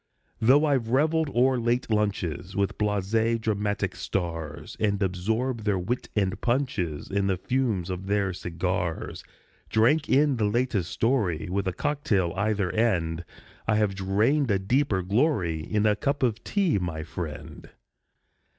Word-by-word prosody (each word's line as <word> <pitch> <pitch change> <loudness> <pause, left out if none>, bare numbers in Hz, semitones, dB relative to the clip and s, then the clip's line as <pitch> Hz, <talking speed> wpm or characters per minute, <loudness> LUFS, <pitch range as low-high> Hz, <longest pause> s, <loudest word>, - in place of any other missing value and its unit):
Though 135 +7 +5
I've 135 -6 +1
reveled 155 +4 +2
o'er 130 0 +3
late 120 0 0
lunches 95 -4 -1
With 100 -1 -1
blasé 105 +3 +1
dramatic 105 -2 -1
stars, 80 -4 -4
And 100 -2 +1
absorbed 110 +6 -1
their 105 -2 +1
wit 115 +8 -3
and 100 -1 0
punches 120 - -1
And 100 0 0
the 95 - +1
fumes 110 -5 -1
of 90 +1 -5
their 100 -2 +1
cigars 90 0 -3 0.5
Drank 125 +8 +3
in 140 -1 +4
the 110 - +1
latest 105 -5 0
story, 105 - 0
With 100 0 -1
a 95 - 0
cock 145 - -2
tail 95 -5 +1
either 100 -2 0
end, 85 -7 0 0.4
I 110 - +3
have 105 -2 +2
drained 105 +9 +1
a 100 - +3
deeper 100 0 +1
glory 95 - +1
In 105 +6 0
a 105 -1 +4
cup 140 +4 -1
of 115 -3 0
tea, 190 - +1
my 80 -3 -3
friend. 80 -2 -7
105 Hz, 150 wpm, -26 LUFS, 95-120 Hz, 0.5 s, Though